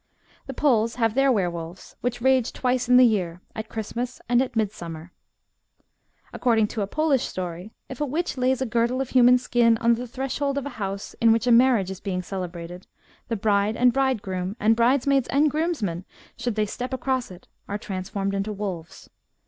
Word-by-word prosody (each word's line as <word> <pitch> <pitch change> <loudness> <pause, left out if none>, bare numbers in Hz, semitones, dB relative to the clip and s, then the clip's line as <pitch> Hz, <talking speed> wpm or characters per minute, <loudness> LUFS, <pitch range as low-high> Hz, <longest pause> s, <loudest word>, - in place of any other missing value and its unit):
The 270 - -5
Poles 230 -6 +2
have 225 -3 +1
their 270 +2 +3
were 200 -7 +2
wolves, 170 +1 -9
which 245 0 -2
rage 260 -2 +3
twice 250 -1 -1
in 250 - +7
the 255 - +8
year 180 -7 0
— - - -38
at 220 -1 -6
Christmas 235 +3 -4
and 245 +1 +3
at 255 -2 -3
midsummer. 175 -6 -4 1.2
According 225 -4 +2
to 220 - -4
a 200 - -1
Polish 290 +1 +1
story, 180 +1 -5 0.2
if 265 +1 -8
a - - +2
witch 330 +6 -2
lays 260 0 +1
a - - -2
girdle 235 +2 0
of 265 -1 -2
human 250 -1 +6
skin 240 -2 +2
on 235 +1 +3
the 245 +2 -4
threshold 270 +2 -2
of 280 - -2
a - - -3
house 195 0 -4
in 230 -1 +6
which 225 +1 +2
a 245 - +3
marriage 235 -5 +4
is 190 - -7
being 185 -3 -3
celebrated, 180 -1 -7 0.4
the 230 - -1
bride 205 0 +1
and 245 0 +4
bridegroom, 200 -8 -1
and 220 +2 +4
bridesmaids 260 +2 +2
and 290 +1 +2
groomsmen, 285 - -2 0.3
should 240 -2 -3
they 215 -1 +1
step 250 +5 -4
across 260 -1 -2
it, 180 -1 -13 0.2
are 205 - -2
transformed 195 0 -4
into 200 +2 -2
wolves. 190 -6 -6
230 Hz, 190 wpm, -24 LUFS, 195-255 Hz, 1.2 s, the